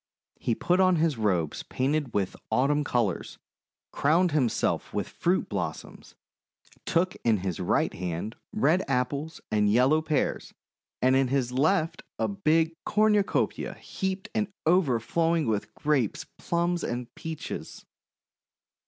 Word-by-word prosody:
He 115 - 0
put 180 +9 +1
on 185 -1 +5
his 160 -2 +2
robes 90 -8 0
painted 140 0 -1
with 100 -3 -1
Autumn 145 +3 +2
colours, 120 -9 -1 0.5
crowned 170 +5 +3
himself 135 -6 0
with - - -1
fruit 180 +2 0
blossoms, - - -5 0.7
took 180 +2 +1
in 115 -2 +3
his 90 -4 -2
right 90 - +1
hand 90 +4 -4 0.2
red 185 -4 +2
Apples 140 +4 -2
and 105 -1 +3
yellow 130 +7 +4
Pears, 155 -2 -1 0.5
and 130 +1 +5
hi 135 - +4
his 130 -1 0
left 160 +5 +1 0.2
a - - 0
big 165 -4 +1
cornucopia 210 -1 +1
heaped 190 +1 -4
to 215 -2 0 0.2
overflowing 165 0 +2
with 110 -3 -1
Grapes, 140 -8 0
Plums, 170 0 0
and 120 0 -4
Peaches. 160 -1 -7
150 Hz, 125 wpm, -27 LUFS, 120-170 Hz, 0.7 s, on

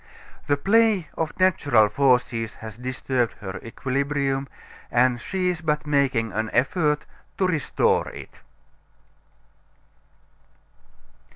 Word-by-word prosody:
The 145 - +2
play 205 0 +3
of 160 +3 -3
natural 145 - +4
forces 120 -2 +1
has 110 -2 -9
disturbed 125 0 -2
her 95 -2 -7
equilibrium, 135 +3 -2 0.4
and 120 0 +2
she 185 -2 -1
is 175 -2 -3
but 150 -2 -1
making 135 -6 +1
an 110 +2 -1
effort 150 +4 +1 0.3
to 190 - +2
restore 165 -7 +1
it. - - -11
140 Hz, 100 wpm, -24 LUFS, 120-155 Hz, 0.4 s, natural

